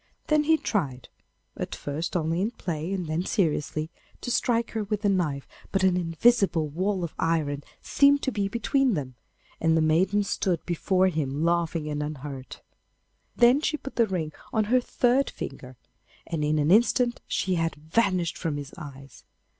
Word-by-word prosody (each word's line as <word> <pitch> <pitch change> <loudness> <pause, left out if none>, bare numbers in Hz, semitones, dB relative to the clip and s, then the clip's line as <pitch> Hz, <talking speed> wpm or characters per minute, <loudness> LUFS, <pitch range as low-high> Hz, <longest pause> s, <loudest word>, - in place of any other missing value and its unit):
Then 305 -1 +3
he 320 +1 +5
tried, 140 - -2 0.5
at - - -4
first 155 +5 -3
only 165 +1 0
in 210 - +1
play, 170 -6 -4
and 190 -3 -2
then 160 +2 -1
seriously, 155 -4 -1 0.3
to 245 - -3
strike 235 -1 +1
her 220 -1 -2
with 210 +1 -3
the 205 - +3
knife, 155 -8 0 0.2
but 195 0 +1
an 185 -1 +4
invisible 180 -1 +2
wall 185 +5 -1
of 170 - -4
iron 150 -3 0 0.2
seemed 280 0 +4
to 265 - 0
be 200 -4 -1
between 250 +2 +1
them, 135 -4 -4 0.5
and 165 0 +3
the - - +4
maiden 180 +6 +3
stood 185 -3 -1
before 185 +2 +2
him 150 -3 -2
laughing 170 -2 0
and 150 -1 -2
unhurt. 140 -3 -7 0.7
Then 245 +4 +5
she 310 0 0
put 275 - -9
the 230 -2 +3
ring 170 -6 -2 0.2
on 220 - +2
her 255 - +5
third 250 +2 +2
finger, 130 -2 -8 0.5
and 165 -3 -3
in 150 +1 +1
an 150 +2 +2
instant 240 +3 +3
she 190 - 0
had 165 -1 0
vanished 175 +2 0
from 160 -4 -2
his 145 -1 -7
eyes. 135 -5 -11
175 Hz, 170 wpm, -26 LUFS, 155-210 Hz, 0.7 s, he